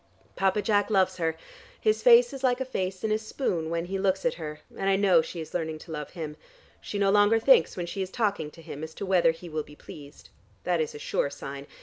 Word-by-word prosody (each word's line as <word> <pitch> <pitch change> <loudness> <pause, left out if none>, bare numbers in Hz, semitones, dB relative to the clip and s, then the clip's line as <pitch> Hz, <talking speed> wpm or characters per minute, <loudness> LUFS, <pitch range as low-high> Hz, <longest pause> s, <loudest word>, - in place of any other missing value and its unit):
Papa 195 +2 +1
Jack 205 0 +2
loves 190 -4 +2
her; 160 -2 -1 0.4
his 430 0 +1
face 485 0 +6
is 270 -1 -8
like 250 -1 +2
a 260 - -2
face 190 -7 -3
in 220 - 0
a 215 - +2
spoon 200 - -2
when 170 0 -2
he 190 +2 -3
looks 190 +1 0
at 250 - +2
her, 150 -2 -7
and 195 - -1
I 195 - +4
know 190 -4 +5
she 170 - -7
is 160 -1 -8
learning 160 -2 -2
to 160 - -12
love 150 -2 -5
him. 155 -4 -6 0.4
She 205 - -5
no 200 -1 +3
longer 205 +2 +5
thinks 225 -8 +4
when 175 - -2
she 195 +3 -5
is 190 - -3
talking 200 -7 -1
to 165 +2 -15
him, 150 0 -7
as 160 0 -7
to - - -5
whether 185 -3 +4
he 165 +2 -4
will 155 -2 -3
be 150 0 -13
pleased. 145 -1 -13 0.3
That 175 -2 +1
is 155 - -3
a - - -5
sure 145 - -1
sign. 140 0 -8
185 Hz, 250 wpm, -27 LUFS, 160-205 Hz, 0.4 s, face